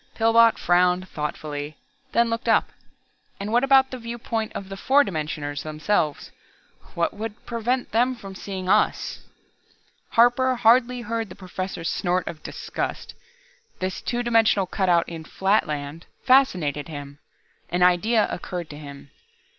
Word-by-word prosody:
Pillbot 230 0 +5
frowned 180 +1 +2
thoughtfully, 150 -1 -5 0.3
then 235 0 +2
looked 230 0 -2
up. 225 - +3 0.7
"And 200 +2 -4
what 240 +2 +3
about 270 -1 +5
the 255 - -6
viewpoint 230 -1 -4
of 195 - -6
the 195 - -6
four 270 +8 +4
dimensioners 150 - -4
themselves 155 0 -1 0.6
what 170 0 0
would 215 +1 -7
prevent 240 +2 -2
them 245 +3 +2
from 195 -5 -10
seeing 190 -1 -6
us?" - - +1 0.9
Harper 250 +2 +4
hardly 245 +1 +3
heard 225 -1 -3
the - - -10
Professor's 185 -2 -5
snort 180 0 -1
of 155 -2 -6
disgust. - - -5 0.6
This 185 0 -3
two 245 0 -2
dimensional 225 -4 +3
cutout 180 -3 +1
in 165 -1 -7
"Flatland" 155 -5 -1 0.2
fascinated 180 - +3
him. 145 -2 -8 0.5
An 175 +1 +1
idea 205 +5 +3
occurred 175 -3 -5
to 145 - -9
him. 140 -1 -11
195 Hz, 135 wpm, -24 LUFS, 165-230 Hz, 0.9 s, Pillbot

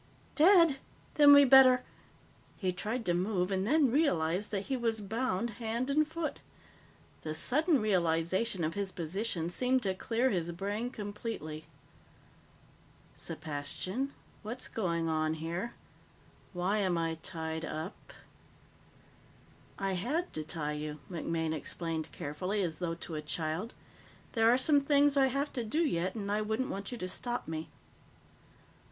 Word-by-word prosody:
"Dead? 335 -3 +6 0.4
Then 290 -1 +7
we'd 285 -2 +8
better 255 -2 +8 0.4
" - - -30 0.3
He 185 -3 -1
tried 225 +6 -3
to 175 - +2
move 180 +1 0
and 190 +1 0
then 285 -1 +4
realized 200 - +1
that 200 -2 -1
he 270 - -1
was 230 -3 0
bound 225 +1 -1
hand 235 +4 -1
and 305 +2 +3
foot. 320 0 -4 0.8
The 155 0 -4
sudden 295 - +3
realization 185 0 +1
of 155 +1 0
his 200 0 -3
position 175 +1 -2
seemed 255 +8 +1
to 190 -2 +1
clear 235 +6 0
his 175 -2 -1
brain 205 +6 -3
completely. 205 - -6 1.5
"Sepastian, 160 - -4 0.3
what's 225 +4 -5
going 170 -6 -1
on 155 0 0
here? 170 +8 -4 0.8
Why 185 +3 0
am 185 -4 +1
I 165 -1 -1
tied 160 0 -4
up?" 160 0 -6 1.7
"I 195 -1 -1
had 265 - -2
to 155 - -2
tie 155 -1 -2
you," 150 0 -5
MacMaine 165 -1 -2
explained 160 0 -3
carefully, 180 +8 -2
as 165 -3 -3
though 170 -2 -2
to 170 0 -7
a 155 - -3
child. 160 +7 -3 0.6
"There 225 -1 +4
are 245 - +5
some 285 +2 +3
things 285 0 +4
I 270 -1 +5
have 275 +3 -2
to 245 - -2
do 235 +9 0
yet, 185 - -1
and 200 -2 -3
I 210 +1 +1
wouldn't 220 +4 -1
want 200 +3 -5
you 245 - -5
to 185 - -4
stop 240 +6 -3
me. 160 0 -4
200 Hz, 145 wpm, -32 LUFS, 165-250 Hz, 1.7 s, we'd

